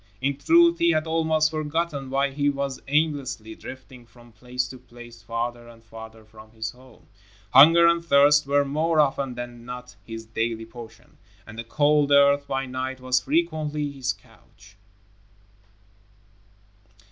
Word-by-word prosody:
In 140 +2 -1
truth, 340 - +4
he 170 - +3
had 155 0 0
almost 160 -1 +1
forgotten 155 -2 -3
why 140 +1 0
he 145 +1 0
was 140 -1 -3
aimlessly 140 -7 -1
drifting 130 0 -12
from 120 0 -19
place 125 +3 -4
to 130 - -11
place, 120 -2 -14
farther 120 +1 -4
and 115 -1 -16
farther 110 -1 -12
from 110 0 -16
his 110 0 -5
home. 125 -1 -20 0.5
Hunger 165 +6 +8
and 170 0 +3
thirst 145 -1 +4
were 140 0 +2
more 155 +3 0
often 135 -3 +1
than 120 -1 -8
not 125 0 -9
his 115 0 -8
daily 115 0 -3
portion, 115 0 -14 0.3
and 115 - -12
the 115 - -6
cold 145 +4 +2
earth 140 0 +4
by 135 -1 -2
night 130 0 -5
was 130 0 +1
frequently 150 0 -1
his 135 -2 -2
couch. 100 -2 -22
135 Hz, 145 wpm, -24 LUFS, 120-150 Hz, 0.5 s, Hunger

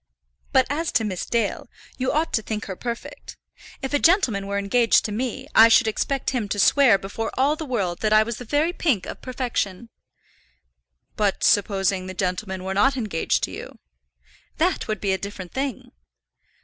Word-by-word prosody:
But 260 -1 +4
as 310 +4 -2
to 225 - +2
Miss 190 -4 -3
Dale, 230 -4 -1 0.3
you 260 0 -1
ought 310 +3 0
to 220 - +2
think 215 0 -4
her 190 - -6
perfect. 235 +4 -7 0.5
If 270 - -3
a 290 - +3
gentleman 255 - +3
were 200 0 -2
engaged 225 +4 +3
to 215 - -3
me, 240 +3 -3
I 225 - +8
should 230 +1 +5
expect 270 +5 -1
him 235 -6 -2
to 205 - -2
swear 240 +1 +5
before 200 +4 -5
all 280 +4 +3
the 310 -1 -7
world 195 -9 -2
that 215 - 0
I 215 0 +6
was 235 0 -5
the - - -8
very 295 +8 0
pink 260 - 0
of - - -8
perfection." 235 -4 -3 1.3
"But 205 -2 0
supposing 195 -2 +2
the 185 - -7
gentleman 185 +1 -3
were 190 0 -3
not 265 +7 +3
engaged 210 -9 -1
to - - -1
you?" - - -9 0.8
"That - - 0
would 215 -2 -3
be 195 -2 +1
a 190 - -2
different 200 -3 -7
thing." 270 -3 -4
220 Hz, 185 wpm, -23 LUFS, 200-260 Hz, 1.3 s, I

